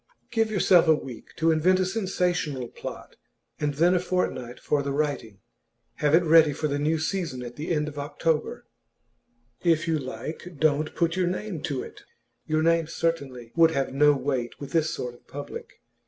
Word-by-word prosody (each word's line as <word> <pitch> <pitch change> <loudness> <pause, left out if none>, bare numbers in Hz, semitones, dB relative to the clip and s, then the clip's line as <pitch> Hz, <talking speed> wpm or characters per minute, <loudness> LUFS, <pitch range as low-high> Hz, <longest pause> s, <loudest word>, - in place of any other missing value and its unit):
Give 225 -2 +1
yourself 185 -4 +4
a 160 - +6
week 130 -5 -9
to 165 0 +2
invent 180 +4 +3
a 185 - +2
sensational 180 - -1
plot, - - -9 0.4
and 145 -1 -1
then 170 +4 +4
a 180 - +3
fortnight 175 -9 -2
for 145 - 0
the 140 0 -3
writing. 140 -8 -2 0.6
Have 150 +1 +3
it 175 - +4
ready 160 -2 +6
for 150 - -1
the 145 0 -1
new 155 +2 +1
season 160 -6 -2
at 120 0 -8
the 150 - -5
end 150 -3 +1
of 150 -1 -6
October. 150 +2 -1 1.0
If 170 -1 +2
you 160 -2 +1
like, 145 +7 -7
don't 155 0 +1
put 170 -1 +1
your 185 -1 +1
name 185 -2 -3
to 135 -3 -2
it; - - -11 0.5
your 155 0 +1
name 165 -1 +3
certainly 140 -8 -3
would 165 -1 +6
have 135 -4 -1
no 145 +2 +5
weight 130 -3 -2
with 140 - -8
this 160 -2 +2
sort 125 -1 -4
of 120 - -21
public. 455 - -8
155 Hz, 185 wpm, -26 LUFS, 140-170 Hz, 1.0 s, a